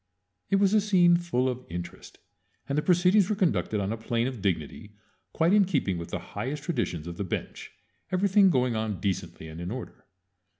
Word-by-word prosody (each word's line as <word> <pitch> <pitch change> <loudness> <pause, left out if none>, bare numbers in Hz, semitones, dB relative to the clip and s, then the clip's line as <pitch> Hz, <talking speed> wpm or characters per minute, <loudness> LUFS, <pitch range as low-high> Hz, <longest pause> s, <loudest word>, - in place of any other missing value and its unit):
It - - +3
was 195 0 +3
a 215 - +5
scene 180 -4 +4
full 170 -7 0
of 130 0 -3
interest, 85 0 -8 0.5
and 140 - -2
the 150 - +2
proceedings 180 +4 +4
were 215 - +1
conducted 110 - 0
on 100 +2 -1
a - - -4
plane 115 +1 -1
of 125 -5 -4
dignity 95 +3 -3 0.4
quite 165 +4 +2
in 210 -1 +6
keeping 140 - -1
with 85 - -7
the - - -3 0.2
highest 135 +8 -4
traditions 115 - -2
of 85 0 -7
the 100 - -2
bench, 95 - -5 0.4
everything 195 +1 +4
going 125 -6 +1
on 110 -3 -2
decently 95 -4 -3
and 80 +2 -8
in 85 - -4
order. 125 +2 -8
130 Hz, 195 wpm, -27 LUFS, -, 0.5 s, in